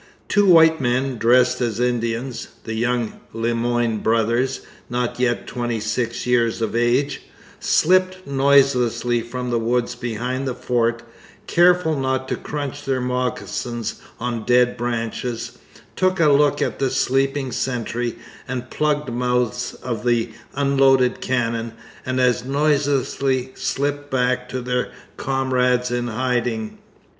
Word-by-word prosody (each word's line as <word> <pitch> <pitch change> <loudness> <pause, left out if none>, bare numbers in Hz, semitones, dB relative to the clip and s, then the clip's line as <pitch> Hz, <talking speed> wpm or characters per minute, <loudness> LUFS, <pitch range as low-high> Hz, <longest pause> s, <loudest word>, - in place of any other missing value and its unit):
Two 205 -1 +3
white 160 -2 +6
men 125 0 0
dressed 125 +3 +4
as 115 -2 -1
Indians 120 0 -1 0.2
the 110 - -5
young 120 0 -1
Le 115 +1 -1
Moyne 120 -1 0
brothers, 115 +4 +1 0.3
not 125 0 -2
yet 120 -1 0
twenty 120 -2 -3
six 115 +2 -2
years 120 -2 +2
of 115 0 -2
age 125 +4 +1 0.4
slipped 185 +2 +2
noiselessly 135 -4 +3
from 125 +1 -5
the 120 - +1
woods 120 +1 0
behind 125 +3 -3
the 125 - -2
fort, 120 -2 0 0.4
careful 175 -2 +4
not 130 -1 -1
to - - 0
crunch 145 -1 -5
their 135 -2 0
moccasins 125 -2 -3 0.2
on 120 -1 -3
dead 125 +1 +3
branches, 120 0 -3 0.4
took 185 0 +1
a 155 -3 +5
look 145 0 +3
at - - -3
the 135 - +1
sleeping 135 +1 0
sentry 120 -1 -2 0.3
and 125 -1 -3
the 130 - -15
plugged 150 -4 0
mouths 125 0 -1
of 115 -4 -3
the 120 -2 +1 0.2
unloaded 135 -2 +3
cannon, 115 -2 -1 0.3
and 130 0 0
as 125 -2 +2
noiselessly 140 -2 0
slipped 145 +1 -2
back 125 -1 0
to 130 0 -3
their 125 0 -1 0.3
comrades 125 -2 +1
in 120 0 -1
hiding. 120 -2 -2
125 Hz, 130 wpm, -21 LUFS, 120-135 Hz, 0.4 s, white